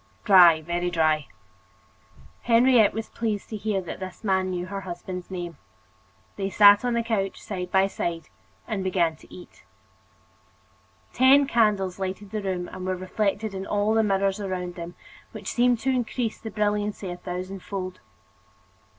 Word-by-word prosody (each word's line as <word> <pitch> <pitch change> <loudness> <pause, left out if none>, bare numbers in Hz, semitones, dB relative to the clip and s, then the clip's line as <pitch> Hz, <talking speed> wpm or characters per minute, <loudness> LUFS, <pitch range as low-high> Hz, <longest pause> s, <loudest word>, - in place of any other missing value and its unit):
"Dry, 175 -7 +7
very 175 +2 -1
dry." 155 -3 +1 1.1
Henriette 235 -2 +5
was 225 0 -4
pleased 215 -3 -3
to 220 - -5
hear 210 -2 -1
that 175 - -7
this 185 +1 -8
man 190 -2 +1
knew 180 -1 -3
her 195 +1 -5
husband's 180 0 -7
name. 175 -4 -6 0.8
They 195 -1 -2
sat 205 +1 +7
on 245 -1 0
the 235 - +1
couch, 205 -4 -2
side 180 -3 -5
by 190 0 +4
side, 170 -4 -4 0.4
and 210 -4 -2
began 175 -4 +1
to - - -19
eat. 180 - -13 1.5
Ten 270 +3 +6
candles 210 -7 +1
lighted 190 +1 -5
the 215 - -3
room 185 -2 -3
and 185 - -8
were 185 0 -1
reflected 200 +3 -2
in 190 - -4
the 210 +3 +1
mirrors 195 -1 +1
all 200 - -3
around 180 -1 -4
them, 175 0 -8 0.4
which - - -6
seemed 245 0 +3
to 265 - +1
increase 245 -2 -2
the 220 - -7
brilliancy 210 -2 -1
a 175 - -6
thousand 180 +2 -6
fold. 185 -2 -6
195 Hz, 160 wpm, -25 LUFS, 180-215 Hz, 1.5 s, Dry